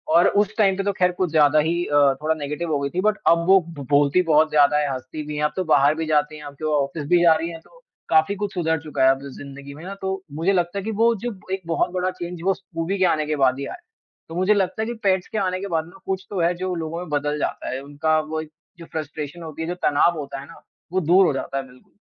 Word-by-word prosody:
और 170 - +6
उस 205 +1 +1
टाइम 195 -3 +3
पे 195 - -1
तो 200 - +1
ख़ैर 180 0 +4
कुछ 180 -1 -1
ज़्यादा 155 -1 +5
ही 170 +3 +1
अ, 145 - -5 0.3
थोड़ा 160 +1 +1
नेगेटिव 150 +3 -4
हो 145 - +1
गई 140 - -2
थी, 180 +5 -2
बट 215 +1 +2
अब 170 0 +4
वो 195 0 +7
ब 145 -5 -8
बोलती 145 +4 +4
बहुत 155 +1 +5
ज़्यादा 150 0 +4
हैं, 145 - 0
हँसती 130 +4 -6
भी 150 - -4
हैं। 150 - -1
अब 150 - -1
तो 185 - -1
बाहर 145 +2 +4
भी 160 0 -2
जाती 150 0 +1
हैं। 150 - -11
आपके 145 +2 -7
वो 155 - 0
ऑफ़िस 145 +2 -5
भी 175 +2 +4
जा 165 - +7
रही 165 +2 -2
हैं, 165 - -8
तो - - -22 0.3
काफ़ी 160 +5 +3
कुछ 205 0 -4
सुधर 160 -3 0
चुका 150 -4 -2
है 130 - +7
अब 135 - -2 0.2
ज़िंदगी 140 0 -9
में 155 - -11
ना, 195 - -6
तो 190 0 -2
मुझे 165 +6 +1
लगता 175 +1 0
है - - -6
कि 225 - -2
वो 235 0 +5
जो 240 - -1 0.2
एक 190 - -2
बहुत 165 - +1
बड़ा 185 0 -1
चेंज 175 -1 -7
वो 195 - +4
स्कूबी 180 0 -4
के 185 - +3
आने 155 -3 +1
के 150 0 -1
बाद 130 -1 +2
ही 140 - -3
आया। - - -7 0.5
तो 165 - -7
मुझे 185 +4 +3
लगता 200 +1 0
है - - 0
कि 240 - -3
पेट्स 190 -2 +2
के 220 - -4
आने 185 -2 0
के 200 - -4
बाद 160 -3 -1
ना 175 +7 -16
कुछ 190 0 -3
तो 195 - -3
है 170 +1 +3
जो 185 +1 -3
लोगों 165 0 -4
में 180 - -7
बदल 150 0 -1
जाता - - -3
है। 135 - -4
उनका 155 +3 0
वो 155 0 -4
एक 155 - -11 0.3
जो 170 - -9
फ़्रस्ट्रेशन 155 +1 -5
होती 160 0 -7
है, 160 - -3
जो 175 - -3
तनाव 155 +3 +3
होता 140 -1 -6
है 135 - -9
ना, 165 - -14 0.3
वो 185 - +3
दूर 180 +4 +5
हो 155 - +2
जाता 135 0 -4
है 135 - -2
बिल्कुल। 125 +9 -21
160 Hz, 290 wpm, -23 LUFS, 150-185 Hz, 0.5 s, वो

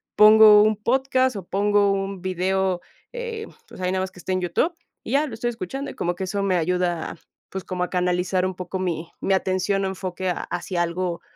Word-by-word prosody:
pongo 215 0 +8
un 215 0 +3
podcast 260 +1 +1
o 185 - -7
pongo 205 0 +2
un 195 -1 -2
video, 185 0 0 0.3
eh, 465 -3 -5 0.2
pues - - -11
ahí 180 0 0
nada 190 0 0
más 190 - -5
que 180 - -15
esté 185 - -3
en 185 - 0
YouTube 180 - 0 0.3
y - - -6
ya, 295 +2 +3
lo - - -8
estoy 240 +2 -2
escuchando, 240 +6 -5
y - - -13
como 175 +1 -1
que 190 - -3
eso 200 +1 -2
me 190 -2 +1
ayuda, 175 0 -1 0.3
pues, 190 -1 -5
como 180 -1 -3
a - - -3
canalizar 180 0 0
un 185 - -2
poco 180 +1 -5
mi 170 -3 -2
mi 195 - +1
atención 190 +1 +1
o - - 0
enfoque 185 -1 -3
ha 175 - -2
hacia 175 0 -2
algo, 170 0 -2
190 Hz, 215 wpm, -23 LUFS, 180-210 Hz, 0.3 s, pongo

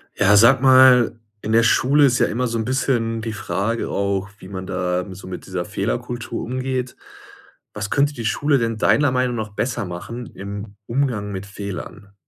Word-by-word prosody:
Ja, 105 0 +4
sag 120 +5 +6
mal, 130 -3 +6 0.2
in 110 - -4
der 115 0 +5
Schule 140 +5 +4
ist 125 -2 +2
ja - - +3
immer 125 +4 -1
so 115 0 -2
'n 110 - -2
bisschen 120 -3 0
die 115 - -4
Frage 105 +2 -2
auch, 100 0 -1
wie - - -11
man 95 -1 -6
da 90 -1 -1
so 95 - -11
mit 95 - -7
dieser 90 -2 -4
Fehlerkultur 120 +3 -3
umgeht. 130 0 -3 0.8
Was 105 0 -4
könnte 145 +4 +2
die 115 -4 -6
Schule 145 +5 +2
denn 115 -2 -1
deiner 145 +5 +3
Meinung 125 -1 0
noch 105 -3 -5
besser 120 -1 -2
machen 95 +8 -7
im 100 +1 -7
Umgang 115 -5 -1
mit 95 0 -5
Fehlern? 100 0 -8
115 Hz, 180 wpm, -21 LUFS, 100-125 Hz, 0.8 s, sag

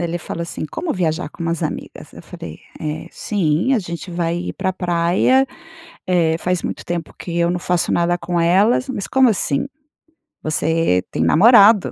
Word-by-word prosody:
Ele 170 0 -2
falou 170 0 -5
assim: 170 -2 -5
"Como 340 -2 -3
viajar 165 -2 -1
com - - -9
umas 170 +1 -2
amigas?". 155 - -6
Eu - - -12
falei: 80 -1 -10 0.2
"Eh, 155 0 -4
sim! 185 - 0
A 240 - +2
gente 170 -1 -6
vai 170 -1 -1
ir 175 - -4
para 190 0 -3
a - - 0
praia. 180 +9 +2 0.6
Eh, 170 -3 +2
faz 180 0 -1
muito - - -5
tempo 170 -2 -4
que 170 -1 -5
eu 170 0 +2
não 180 - -1
faço 180 -1 0
nada 175 +1 +1
com 175 -1 -2
elas". 200 +10 +3
"Mas, 230 -7 -3
como 265 -2 +4
assim? 170 - 0 0.8
Você 155 - +1
tem 80 - 0
namorado". 205 - +6
175 Hz, 180 wpm, -19 LUFS, 165-190 Hz, 0.8 s, namorado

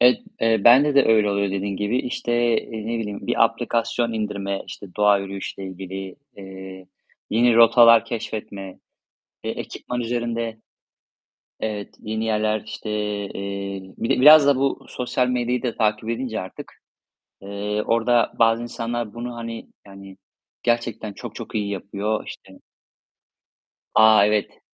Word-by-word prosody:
Evet, 125 +1 +6 0.2
eee, 115 -2 +3
bende 140 +5 +6
de 140 - +6
öyle 110 -2 +4
oluyor 100 0 0
dediğin 100 0 -3
gibi. 105 +5 0
İşte, 125 -1 -3 0.3
eee, 110 -1 -8
ne 115 0 -2
bileyim, 105 -2 -5
bir - - +4
aplikasyon 115 0 -1
indirme, 100 -3 -3
işte, 100 - -9
doğa 105 -1 +4
yürüyüşüyle 95 0 -6
ilgili, 95 0 -7 0.2
eee, 95 -1 -10 0.4
yine 120 +1 +4
rotalar 115 0 +7
keşfetme, 100 -4 -6 0.7
eee, - - -2
ekipman 125 0 -5
üzerinde 115 -1 -2 1.0
Evet, 105 -2 -4
yeni 110 +1 -3
yerler, 110 -1 0
işte, 110 0 -7 0.4
eee 100 -1 -6
bir 115 - -3
de - - +2
biraz 150 0 +9
da 140 - +5
bu 135 +1 -1
sosyal 125 0 -1
medyayı 125 0 -1
da 120 -3 -2
takip 110 0 0
edince 115 -1 -3
artık, 95 - -9 0.7
eee, 100 +1 -3
orada 115 +1 +2
bazı 115 0 +4
insanlar 120 -2 -4
bunu, 120 0 -6
hani, 115 -1 -6 0.2
yani, 95 -1 -12 0.5
gerçekten 115 -3 -1
çok - - -9
çok - - -8
iyi 105 -1 -1
yapıyor, 100 +2 -3
işte 95 -1 -11 1.4
A, 110 -1 +7
evet! 105 0 0
110 Hz, 140 wpm, -22 LUFS, 100-120 Hz, 1.4 s, biraz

